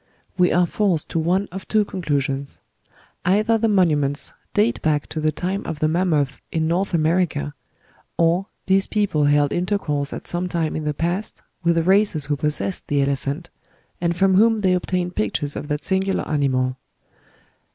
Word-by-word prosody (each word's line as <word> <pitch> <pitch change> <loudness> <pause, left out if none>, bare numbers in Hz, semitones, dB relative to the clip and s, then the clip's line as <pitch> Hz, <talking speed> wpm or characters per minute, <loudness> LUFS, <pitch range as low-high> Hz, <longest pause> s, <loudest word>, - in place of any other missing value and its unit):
We 180 -1 +3
are 175 0 +4
forced 180 -3 0
to 165 - 0
one 185 +5 +1
of 190 +1 -7
two 215 -1 +2
conclusions: 140 -7 -2 0.6
either 215 +5 +2
the 225 - +2
monuments 150 -8 +1 0.2
date 215 +3 +1
back 150 -2 +1
to 160 - -4
the 155 0 +1
time 185 +5 -3
of 160 - -3
the 155 - +1
mammoth 155 -5 0
in 160 -1 0
North 180 +3 0
America, 160 -2 +1 0.6
or 170 +4 +2 0.2
these 190 0 +3
people 200 -9 +1
held 145 0 +3
intercourse 175 -6 -1
at - - -7
some 175 +1 -2
time 165 -3 -1
in 155 - -3
the 150 -1 -1
past 175 +7 -3 0.2
with 170 0 +2
races 190 -6 +3
who 145 +1 0
possessed 150 +6 -2
the 145 -2 +2
elephant, 140 +4 -3 0.5
and 170 -1 +1
from 190 +1 +3
whom 220 +3 +4
they 185 -2 +3
obtained 180 0 -1
pictures 140 +8 -1
of 145 - -5
that 150 0 -2
singular 190 0 0
animal. 130 -3 0
170 Hz, 165 wpm, -22 LUFS, 145-190 Hz, 0.6 s, are